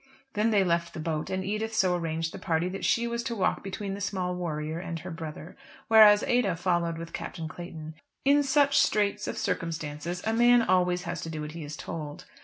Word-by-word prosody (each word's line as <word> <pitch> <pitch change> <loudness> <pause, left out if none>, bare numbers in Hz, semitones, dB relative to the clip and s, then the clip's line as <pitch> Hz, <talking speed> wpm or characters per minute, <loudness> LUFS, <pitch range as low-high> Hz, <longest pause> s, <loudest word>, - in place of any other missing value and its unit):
Then 215 +2 +2
they 205 -3 +4
left 170 -1 0
the - - -5
boat, 155 -1 -2
and 190 0 -2
Edith 215 +2 -2
so 185 -4 +3
arranged 165 -1 -2
the - - -7
party 165 +1 0
that 195 +1 -6
she 235 0 +2
was 235 0 -2
to 235 0 -3
walk 200 - 0
between 195 +1 -4
the 200 - -6
small 185 -3 -2
warrior 160 -2 -3
and 170 -2 -5
her 180 - -7
brother, 160 0 -7 0.3
whereas 215 -2 +8
Ada 240 -8 +2
followed 170 -1 0
with 165 0 -8
Captain 160 -1 -5
Clayton. 160 -1 -8 0.3
In 285 +1 +5
such 280 0 +3
straits 210 -7 +1
of - - -4
circumstances 165 +1 -3
a 220 - +1
man 240 +1 +5
always 180 -2 +2
has 170 -2 -4
to 165 - -5
do 155 -1 -5
what 150 0 -5
he 165 0 -7
is 150 +1 -7
told. 150 -2 -6
180 Hz, 210 wpm, -28 LUFS, 165-210 Hz, 0.3 s, whereas